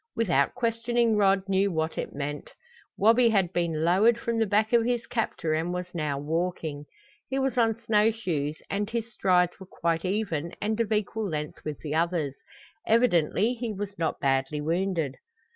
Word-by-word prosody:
Without 170 -11 +2
questioning 235 -1 +1
Rod 195 -2 +3
knew 195 +1 +2
what 160 -1 -1
it - - -4
meant. 145 0 -5 0.4
Wabi 230 +3 +5
had 190 -5 +1
been 165 -3 0
lowered 205 +7 +4
from 230 -1 -1
the 225 - +2
back 215 +3 +1
of 235 -1 +5
his 240 0 -1
captor 215 -8 -2
and 160 +3 -1
was 180 0 -5
now 150 -4 -2
walking. 155 -1 -3 0.4
He 265 - -1
was 270 -1 0
on 230 -2 +2
snow 220 -1 +3
shoes 160 -10 -3
and 205 +1 -2
his 230 0 -4
strides 180 -3 +2
were 190 - -11
quite 165 -1 -1
even 185 -5 -2
and 215 +2 -1
of 225 -2 0
equal 215 0 -1
length 150 -2 -5
with 150 -2 -4
the 150 -1 -4
others. 165 -3 0 0.5
Evidently 220 -1 +3
he 240 -2 -4
was 200 -1 -6
not 165 - -1
badly 135 +2 0
wounded. 165 -2 -1
190 Hz, 175 wpm, -27 LUFS, 160-225 Hz, 0.5 s, Wabi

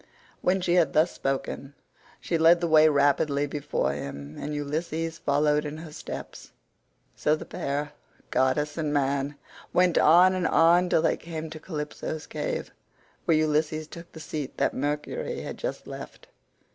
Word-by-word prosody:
When 185 +1 +2
she 175 -1 +1
had 170 -6 +3
thus 160 +3 +4
spoken 135 +1 -3 0.4
she 170 - -2
led 165 +2 +6
the 170 - 0
way 155 -1 +6
rapidly 145 0 +2
before 145 0 -1
him, 70 +1 -7
and 150 - -4
Ulysses 160 +3 -3
followed 150 +1 +2
in 150 0 -5
her 160 -1 -9
steps; - - -8 0.6
so 150 - +2
the - - -8
pair, 145 +1 -3 0.4
goddess 145 +4 +1
and 155 -2 -1
man, 140 0 0 0.4
went 180 -1 +4
on 180 +4 +6
and 185 -2 0
on 175 +2 +4
till 160 - +3
they - - +2
came 160 -1 -6
to 155 - -7
Calypso's 155 -1 -5
cave, - - -4 0.5
where 165 -3 +4
Ulysses 155 0 +1
took 170 +1 -11
the 160 - -11
seat 150 -3 -5
that - - +1
Mercury 150 - -3
had - - -7
just - - -4
left. - - -9
155 Hz, 160 wpm, -27 LUFS, 145-170 Hz, 0.6 s, led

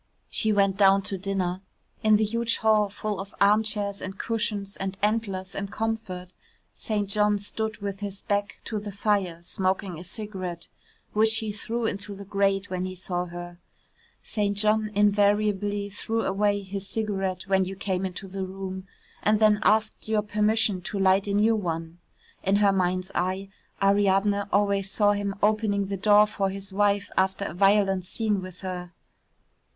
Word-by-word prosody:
She 220 - +1
went 200 -2 +2
down 195 -1 +5
to 195 - -3
dinner 185 -1 -2 0.4
in 215 0 +5
the 215 - +3
huge 230 +2 0
hall 215 -2 +3
full 205 -1 -4
of 195 0 -8
armchairs 205 -1 +2
and 190 +1 -6
cushions 210 -3 -2
and 195 0 -4
antlers 205 -4 -1
and 195 0 -4
comfort 205 -4 -4 0.4
St. 210 -2 -2
John 210 +1 +2
stood 215 +1 -2
with 200 -1 -3
his 200 -1 -5
back 205 0 -2
to 215 - -2
the 205 0 -6
fire 195 -4 0
smoking 185 -1 -1
a - - -8
cigarette 185 -3 -6 0.4
which 220 +1 +5
he 220 -1 -1
threw 225 +3 -3
into 200 -1 -3
the 200 0 -9
grate 195 0 +1
when 185 0 -3
he 185 0 -5
saw 180 -1 -2
her 175 0 -8 0.6
(St. 205 -2 -1
John 215 +1 +2
invariably 205 0 +2
threw 225 +3 -2
away 205 +1 +1
his 195 0 -5
cigarette 195 -4 -2
when 190 -1 +2
you 190 +1 -5
came 190 -1 -2
into 190 +1 -4
the 190 +1 -4
room 190 0 -6 0.3
and 215 +1 +3
then 210 -1 +4
asked 215 0 +1
your 215 -1 +1
permission 210 -1 +1
to 200 - -5
light 195 +1 +3
a 200 - -1
new 220 +2 +4
one. 165 -4 -4 0.4
In 195 +1 +2
her 200 -1 +4
mind's 185 0 0
eye 190 +2 -1 0.3
Ariadne 200 0 +3
always 200 -1 +2
saw 205 +1 +3
him 205 -1 -2
opening 210 -1 +2
the 195 +1 -3
door 205 +2 +5
for 205 -2 -1
his 195 0 -6
wife 205 0 +1
after 190 +1 +1
a - - -4
violent 195 0 +3
scene 210 +1 -1
with 185 -1 -9
her). 180 -2 -5
200 Hz, 165 wpm, -26 LUFS, 190-210 Hz, 0.6 s, down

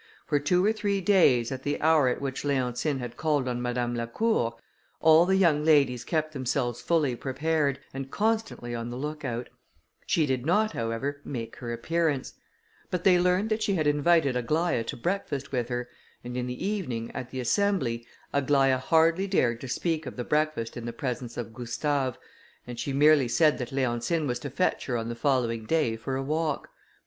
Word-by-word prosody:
For 145 -2 +1
two 180 +6 +2
or 215 - +3
three 205 -2 -1
days, 170 - +4
at 130 -1 -4
the 145 +2 -2
hour 155 -3 +4
at 125 - 0
which 135 -1 -4
Leontine 135 0 0
had 125 -2 -6
called 150 -4 +1
on 120 -1 -2
Madame 120 0 -1
Lacour, 115 - 0 0.4
all 160 +2 +6
the 190 - +3
young 165 -6 +3
ladies 140 -6 +3
kept 155 +2 -1
themselves 125 -3 -1
fully 150 -7 +1
prepared, 140 +2 0 0.2
and 135 0 -5
constantly 220 - -1
on 115 0 -4
the 120 - -5
look 150 +2 -5
out; 120 -2 -3 0.6
she 160 - +2
did 130 -3 -1
not, 210 +8 +2
however, 120 - -3
make 115 -4 -6
her 120 -2 -5
appearance; 150 +3 -1 0.6
but 180 -1 -2
they 180 -2 +5
learned 180 +5 +2
that 215 +1 0
she 200 -2 +1
had 155 -4 0
invited 145 -1 +3
Aglaïa 140 +2 0
to - - -4
breakfast 145 -2 -3
with 125 -2 -1
her; 125 0 -3 0.4
and 125 0 -6
in 125 0 -2
the 125 +6 -4
evening, 130 - -3
at 125 - -5
the 130 - -5
assembly, 130 - +1 0.3
Aglaïa 135 -2 +3
hardly 165 +7 +3
dared 120 -12 +1
to 135 - -6
speak 160 +3 -1
of - - -6
the 125 - -3
breakfast 150 -5 -1
in 120 -1 -6
the 120 - -4
presence 120 -1 -4
of 115 -2 -5
Gustave, 130 +2 -1 0.5
and 120 -1 -7
she 140 - -2
merely 145 -1 +5
said 150 +5 +3
that 125 - -4
Leontine 135 +4 0
was 125 -3 -2
to 145 - -5
fetch 160 +8 0
her 125 -3 0
on 115 0 -3
the 120 - -4
following 115 -4 0
day 155 -9 +1
for 130 +4 -4
a 135 - -2
walk. 155 +1 -1
140 Hz, 190 wpm, -27 LUFS, 120-160 Hz, 0.6 s, all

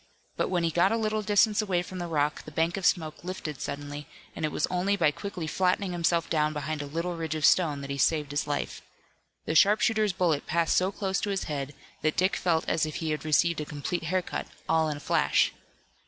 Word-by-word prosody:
But - - -1
when 175 -2 0
he 165 - +1
got 175 +4 +3
a 225 - +2
little 215 -1 0
distance 210 +1 +3
away 185 -4 0
from 185 +1 -8
the 175 - -3
rock 150 -2 0
the - - -8
bank 165 +3 0
of 195 -2 +1
smoke 160 -3 0
lifted 175 -6 -5
suddenly, 145 +1 -5 0.3
and 160 - -5
it 155 - 0
was - - 0
only 185 +3 +1
by 160 -6 +3
quickly 180 +1 -6
flattening 185 +3 0
himself 170 -1 +1
down 155 -1 +1
behind 150 +1 -3
a 145 - -5
little 170 +4 -3
ridge 160 -1 -3
of 155 -2 +1
stone 150 -5 +3
that 140 0 -6
he 140 - -3
saved 150 -2 +2
his 145 +1 -1
life. 145 -1 -3 0.6
The - - -1
sharpshooter's 210 +3 +4
bullet 170 -5 0
passed 170 0 +1
so 185 +1 +2
close 195 -1 -2
to 205 - -2
his 195 -1 -1
head 145 -1 -4 0.3
that 155 0 0
Dick 185 +2 +2
felt 165 -3 0
as 160 -1 +1
if 155 - -6
he 160 -1 -2
had 155 - -2
received 155 +1 +2
a - - -4
complete 150 +4 -4
hair 185 +3 0
cut, - - -5 0.2
all 160 -1 +2
in 150 - -3
a - - -11
flash. - - +2
165 Hz, 230 wpm, -28 LUFS, 150-185 Hz, 0.6 s, sharpshooter's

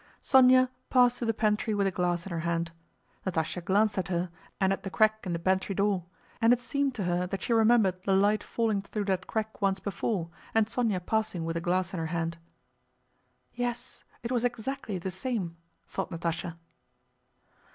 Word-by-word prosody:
Sónya 255 -1 +6 0.2
passed 245 -1 +4
to 240 - -2
the - - +4
pantry 215 0 +1
with 200 -1 +2
a 195 - +2
glass 175 -1 0
in 195 - -7
her 170 - -2
hand. 170 0 -1 0.5
Natásha 170 -1 -2
glanced 200 +3 +2
at 180 - -2
her 175 -1 -1 0.3
and 190 0 +3
at - - -4
the 195 - -5
crack 215 0 +2
in 175 - -1
the - - 0
pantry 190 +3 0
door, 195 -3 +1 0.4
and 230 +1 +6
it 245 - +4
seemed 280 +1 -1
to 210 - -2
her 180 0 0
that 195 +1 -4
she 235 - +1
remembered 220 -5 +4
the 190 +1 +2
light 205 +2 +3
falling 220 -4 0
through 205 +1 -4
that 190 -1 -1
crack 220 0 -3
once 195 -1 +2
before 190 -3 -2 0.2
and 225 -1 +5
Sónya 220 -5 -1
passing 220 -6 -1
with 165 0 -2
a 170 - -1
glass 180 +1 0
in 180 - -2
her 160 - -2
hand. 165 0 -2 1.1
"Yes 245 0 -4 0.2
it 235 - -3
was 245 -2 +1
exactly 240 -3 -2
the 185 +2 -4
same," 185 -4 -3 0.3
thought 195 - -3
Natásha. 170 0 -3
195 Hz, 190 wpm, -29 LUFS, 175-225 Hz, 1.1 s, Sónya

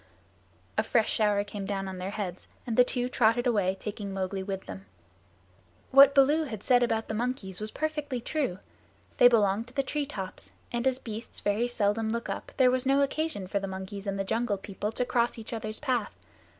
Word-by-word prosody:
A - - +6
fresh 225 -2 +2
shower 210 -2 +2
came 205 -1 -6
down 195 -1 -2
on 190 -1 -6
their 185 +1 -3
heads 195 -4 -5 0.2
and 235 -3 -2
the 250 - +7
two 245 0 -1
trotted 240 -1 +2
away, 200 -6 +2
taking 205 -1 -5
Mowgli 190 0 -2
with 190 0 -4
them. 95 0 -9 1.0
What 275 +1 +8
Baloo 295 +4 +5
had 220 -7 -7
said 250 -2 +4
about 225 -2 0
the - - -3
monkeys 220 -5 -3
was 215 - 0
perfectly 300 -2 -2
true. 255 - -2 0.6
They 245 - +9
belonged 220 -1 +3
to 250 - -16
the 275 - +2
tree 285 +1 -2
tops, 195 -9 -6 0.2
and 240 +2 0
as 260 -1 +2
beasts 225 -3 -7
very 210 +4 +1
seldom 220 -2 0
look 235 +1 -3
up, - - -5
there 255 -2 +5
was 255 0 +1
no 275 +1 +3
occasion 280 -7 -1
for 200 +2 -1
the 195 - -4
monkeys 190 +1 -6
and 195 0 -1
the 195 - 0
Jungle 225 +1 0
People 200 +2 -4
to 250 - -1
cross 240 -1 +1
each 225 +1 -7
other's 215 -1 -3
path. 250 -7 -1
225 Hz, 200 wpm, -28 LUFS, 200-250 Hz, 1.0 s, They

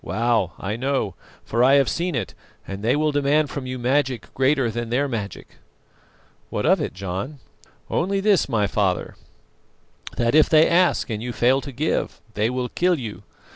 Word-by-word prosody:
Wow! 115 -6 0
I 100 +3 -3
know, 130 -6 -1 0.3
for 115 +2 +1
I 135 +2 +6
have 140 -2 +4
seen 175 -1 -1
it, 110 -7 -3 0.3
and 95 0 -6
they 115 +5 +2
will 155 +1 +1
demand 145 +1 +1
from 135 -3 -5
you 130 0 -4
magic 130 0 -1
greater 135 -2 +2
than 120 +1 -4
their 135 +4 +1
magic." 110 -6 -6 0.9
"What - - -2
of - - +4
it, - - -4
John?" 100 +9 -5 0.5
"Only 195 +3 0
this, 200 -6 +2
my 110 -5 +1
father, 100 -3 -1 1.0
that 120 0 +1
if 155 0 +5
they 155 0 +6
ask 175 -7 +2
and 105 -1 -3
you 125 +1 -4
fail 130 +3 +2
to 140 - -7
give, 145 +5 -2
they 105 +2 +1
will 125 0 -2
kill 180 0 +1
you. 115 -6 -6
130 Hz, 175 wpm, -23 LUFS, 110-145 Hz, 1.0 s, I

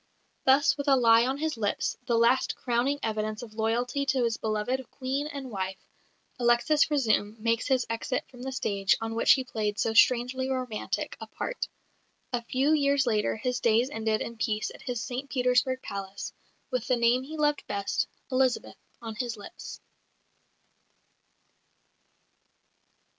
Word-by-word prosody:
Thus 275 +2 +5
with 285 0 -4
a 275 - +6
lie 230 -1 +5
on 265 +1 -1
his 310 -2 -2
lips 205 -2 -1
the 235 - +2
last 240 +3 +3
crowning 250 +3 0
evidence 215 0 -2
of 220 -3 -10
loyalty 235 +5 0
to 265 -2 +2
his 230 -1 +1
beloved 220 +5 -2
Queen 270 +3 -3
and 275 -4 -7
wife 190 -2 -3 0.6
Alexis 240 +5 +4
Razoum 220 -7 +1
makes 230 +1 0
his 260 -3 +2
exit 230 +3 -2
from 245 -2 -14
the 265 +1 -4
stage 200 -6 +1
on 225 0 -3
which 230 - +5
he 265 - 0
played 215 -4 -2
so 225 - 0
strangely 255 +3 +3
romantic 255 -5 -3
a - - -6
part. - - -4 0.7
A 240 - 0
few 265 +5 +1
years 280 -2 +3
later 215 -3 +1
his 250 +3 -2
days 235 +3 +2
ended 220 -2 0
in 235 - -5
peace 215 -1 -1
at - - -13
his 245 -3 -3
St 260 +3 -5
Petersburg 250 0 +1
palace, 195 0 -6 0.4
with 250 -3 -2
the 255 - +2
name 235 +2 +3
he 305 +4 -8
loved 295 -1 +1
best, 200 -1 -1 0.2
"Elizabeth," 255 -1 +1 0.3
on 225 -1 -5
his 235 +1 -3
lips. 205 - -9
245 Hz, 155 wpm, -28 LUFS, 225-265 Hz, 0.7 s, a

